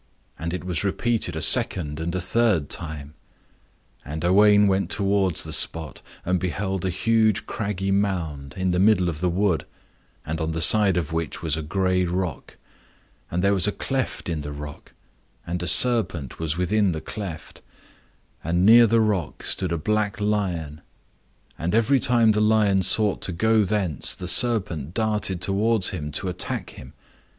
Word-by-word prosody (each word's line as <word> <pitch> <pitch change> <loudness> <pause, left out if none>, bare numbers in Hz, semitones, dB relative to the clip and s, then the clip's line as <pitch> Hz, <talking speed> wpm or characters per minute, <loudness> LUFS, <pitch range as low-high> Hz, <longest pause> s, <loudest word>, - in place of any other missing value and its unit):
And 85 +1 -4
it 90 - -5
was 90 -2 -3
repeated 105 -3 -1
a 80 - -3
second 80 -1 +3
and 85 +2 -4
a - - -1
third 95 -5 0
time. 75 -2 -5 0.9
And 80 +3 -6
Owain 105 +3 +5
went 95 0 0
towards 100 -4 +1
the - - -3
spot, 80 -4 0 0.2
and 90 0 0
beheld 95 +1 -3
a 95 - -1
huge 110 +3 +1
craggy 100 -3 -3
mound, 85 -9 -2
in 95 0 -1
the 90 - 0
middle 95 -3 +3
of 80 -1 -6
the 90 - +1
wood, 90 -1 0 0.6
on 80 +1 -3
the 80 - -3
side 100 +2 +5
of 80 -2 -3
which 80 0 -4
was 80 -2 -1
a 80 - -4
gray 95 +3 0
rock. 90 -3 -4 0.7
And 90 +2 -2
there 100 0 +3
was 95 0 +1
a - - +1
cleft 135 +4 -4
in 80 -3 -3
the 75 0 -7
rock, 75 0 -10 0.5
and 85 +1 -4
a 90 - -4
serpent 90 - +3
was 80 -1 -3
within 95 +1 +1
the 80 - -5
cleft. 90 -6 -8 0.8
And 85 +3 0
near 115 +3 +7
the 115 +1 +2
rock 95 -11 -2
stood 95 -3 -1
a 85 - -1
black 105 +5 -1
lion, 90 -8 -2 0.8
and 85 +6 -2
every 125 +4 +3
time 115 -2 +3
the 105 0 0
lion 105 -3 +2
sought 105 +2 +3
to - - -2
go 110 +5 +2
thence 95 -7 -1
the 90 - -7
serpent 90 - +1
darted 105 -5 -1
towards 100 +1 +1
him 75 -7 -6
to 95 - -3
attack 90 0 -3
him. 65 - -13
95 Hz, 170 wpm, -23 LUFS, 80-105 Hz, 0.9 s, near